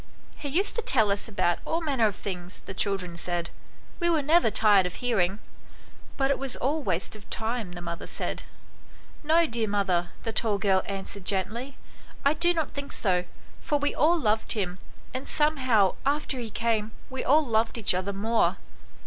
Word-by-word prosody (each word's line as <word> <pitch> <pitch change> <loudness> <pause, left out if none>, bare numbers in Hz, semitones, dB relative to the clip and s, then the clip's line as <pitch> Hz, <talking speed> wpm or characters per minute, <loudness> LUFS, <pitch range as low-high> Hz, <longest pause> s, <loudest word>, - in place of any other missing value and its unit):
" - - -27
He 285 - -2
used 365 +9 +1
to - - +1
tell 220 - +3
us 200 +3 -1
about 175 -5 +1
all 325 - -1
manner 275 -9 +2
of 205 - -3
things," 180 -2 -5
the 195 - -8
children 190 -3 -1
said; 175 -1 -2 0.5
"we 345 -1 +2
were 320 -4 +2
never 320 -2 +4
tired 205 -3 +4
of 180 - -8
hear 245 -4 0
ing." 185 +2 +1 0.4
" - - -24
But 270 0 +2
it 280 - 0
was 270 -2 -1
all 295 +4 0
waste 190 - -2
of 210 - -14
time," 220 -4 -2
the 175 0 -8
mother 170 0 -5
said. - - -3 0.4
" - - -25 0.3
No, 325 +3 +4
dear 235 -6 -1
mother," 185 -4 +1
the 225 - -3
tall 215 -2 +2
girl 190 -1 +3
answered 195 -1 -3
gently, 220 +8 -1 0.2
" - - -22
I 280 - +5
do 345 +3 +3
not 325 -3 -1
think 280 0 -5
so, 180 -3 +1 0.4
for 295 - +1
we 290 0 0
all 330 +4 +3
loved 220 -4 +1
him, 185 -4 -2 0.3
and 260 +1 -4
some 300 +1 +2
how 225 -8 +3
after 280 -1 0
he 235 -2 -4
came 220 0 0 0.2
we 265 - -3
all 300 +3 +4
loved 225 -1 +1
each 215 -5 +3
other 185 +2 -1
more." 220 +4 +1
220 Hz, 200 wpm, -27 LUFS, 195-280 Hz, 0.5 s, I